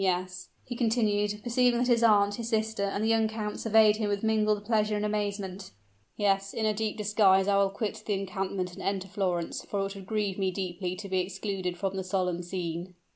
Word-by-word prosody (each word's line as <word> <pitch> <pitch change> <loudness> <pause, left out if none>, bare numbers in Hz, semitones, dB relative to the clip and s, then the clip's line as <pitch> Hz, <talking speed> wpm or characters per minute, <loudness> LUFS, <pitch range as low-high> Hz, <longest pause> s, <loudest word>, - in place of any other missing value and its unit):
Yes," 180 -1 -1 0.2
he 245 - -5
continued, 210 -3 +1
perceiving 245 0 +3
that 245 +1 +1
his 235 -2 +3
aunt, 205 -3 +5
his 230 +1 -4
sister, 220 -1 0
and 200 +1 -2
the - - +1
young 225 -1 +3
count 215 -1 -4
surveyed 220 -1 +5
him 215 -2 -1
with 205 0 -1
mingled 215 -1 +1
pleasure 215 -1 +1
and 210 0 -1
amazement 200 -2 -3 0.5
"yes, 195 -1 +1
in 220 - 0
a 215 - +2
deep 215 +1 -2
disguise 200 -2 +4
I 200 -1 +3
will 200 0 +3
quit 215 +2 -4
the 210 - +1
encampment 190 -1 -3
and 190 - -9
enter 195 -1 -2
Florence, 180 -3 -2
for 200 - -3
it 195 - -5
would 195 -2 -10
grieve 205 -3 -1
me 190 -1 +1
deeply 185 -1 -3
to 200 +2 -7
be 190 -1 0
excluded 185 -1 -3
from 195 +1 -2
the 190 - -2
solemn 185 -2 -1
scene." 175 0 -5
200 Hz, 210 wpm, -28 LUFS, 190-215 Hz, 0.5 s, aunt